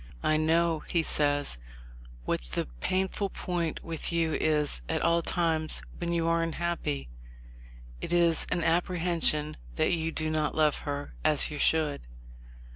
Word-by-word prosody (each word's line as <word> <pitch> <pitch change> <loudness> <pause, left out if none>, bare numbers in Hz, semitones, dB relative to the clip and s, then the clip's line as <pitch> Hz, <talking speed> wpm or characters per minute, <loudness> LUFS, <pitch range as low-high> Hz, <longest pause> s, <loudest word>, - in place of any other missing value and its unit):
"I 155 - +3
know," 165 +1 +2
he 170 -2 +2
says, 145 - +1 0.7
"what - - 0
the - - 0
painful 190 - -1
point 175 -4 -3
with 165 0 -3
you 165 -2 +1
is 150 - +1
at - - 0
all 170 0 +3
times 160 -2 0 0.2
when 170 -1 -2
you 170 -1 +1
are 165 0 +2
un 165 -1 -1
happy; 155 - -2 0.9
it - - -4
is 170 -2 +3
an 175 -2 0
apprehension 170 -3 +2 0.2
that - - +2
you 165 -1 -1
do 155 -1 -1
not 155 -1 0
love 155 -2 +3
her 145 0 -4
as 155 0 +4
you 150 - -5
should. 155 -2 +2
160 Hz, 150 wpm, -29 LUFS, 155-170 Hz, 0.9 s, as